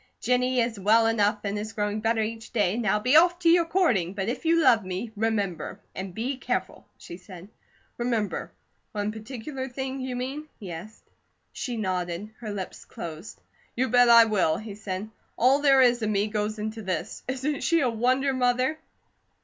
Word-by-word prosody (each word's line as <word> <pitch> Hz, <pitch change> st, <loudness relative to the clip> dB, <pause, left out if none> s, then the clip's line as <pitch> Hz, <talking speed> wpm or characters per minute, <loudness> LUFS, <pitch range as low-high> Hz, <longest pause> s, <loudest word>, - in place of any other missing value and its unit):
"Jennie 250 Hz, 0 st, +1 dB
is 230 Hz, -3 st, -2 dB
well 220 Hz, +4 st, +4 dB
enough 210 Hz, -2 st, +2 dB
and 205 Hz, 0 st, -2 dB
is 215 Hz, +1 st, -6 dB
growing 210 Hz, -1 st, -2 dB
better 225 Hz, 0 st, +1 dB
each 225 Hz, 0 st, -6 dB
day, 205 Hz, -4 st, +1 dB
now 215 Hz, -3 st, +1 dB
be 250 Hz, +6 st, +2 dB
off 345 Hz, +2 st, +6 dB
to 350 Hz, -1 st, +2 dB
your 340 Hz, 0 st, +5 dB
courting, 240 Hz, -, +1 dB
but 195 Hz, 0 st, -2 dB
if 250 Hz, -, -4 dB
you 335 Hz, +1 st, +4 dB
love 235 Hz, -9 st, +5 dB
me, 190 Hz, +5 st, -4 dB
remember, 200 Hz, -5 st, -2 dB
and 190 Hz, 0 st, -5 dB
be 245 Hz, +8 st, -3 dB
careful," -, -, -3 dB
she 170 Hz, -, -10 dB
said. 185 Hz, -1 st, -12 dB, 0.5 s
"Remember 235 Hz, -4 st, -1 dB, 0.4 s
one 205 Hz, 0 st, -1 dB
particular 260 Hz, +4 st, -6 dB
thing 265 Hz, +1 st, -4 dB
you 255 Hz, -1 st, -4 dB
mean?" 270 Hz, +5 st, -4 dB
he 195 Hz, -4 st, -7 dB
asked. 175 Hz, +7 st, -10 dB, 0.5 s
She 245 Hz, -2 st, -4 dB
nodded, 185 Hz, 0 st, -3 dB
her 220 Hz, -, -6 dB
lips 195 Hz, -2 st, -6 dB
closed. 165 Hz, +3 st, -8 dB, 0.3 s
"You 260 Hz, +2 st, 0 dB
bet 245 Hz, -1 st, +5 dB
I 235 Hz, -1 st, +9 dB
will!" 190 Hz, -8 st, +1 dB
he 215 Hz, -1 st, -7 dB
said. 200 Hz, -1 st, -5 dB, 0.3 s
"All 260 Hz, +4 st, +4 dB
there 275 Hz, -2 st, +6 dB
is 240 Hz, -1 st, +3 dB
of 215 Hz, -, 0 dB
me 205 Hz, -1 st, +1 dB
goes 215 Hz, 0 st, -2 dB
into 215 Hz, +1 st, -4 dB
this. 185 Hz, -1 st, -4 dB
Isn't 265 Hz, +3 st, -2 dB
she 335 Hz, 0 st, +3 dB
a 255 Hz, -, +2 dB
wonder, 255 Hz, +4 st, +1 dB
Mother?" 255 Hz, +4 st, +1 dB
225 Hz, 180 wpm, -26 LUFS, 205-255 Hz, 0.5 s, I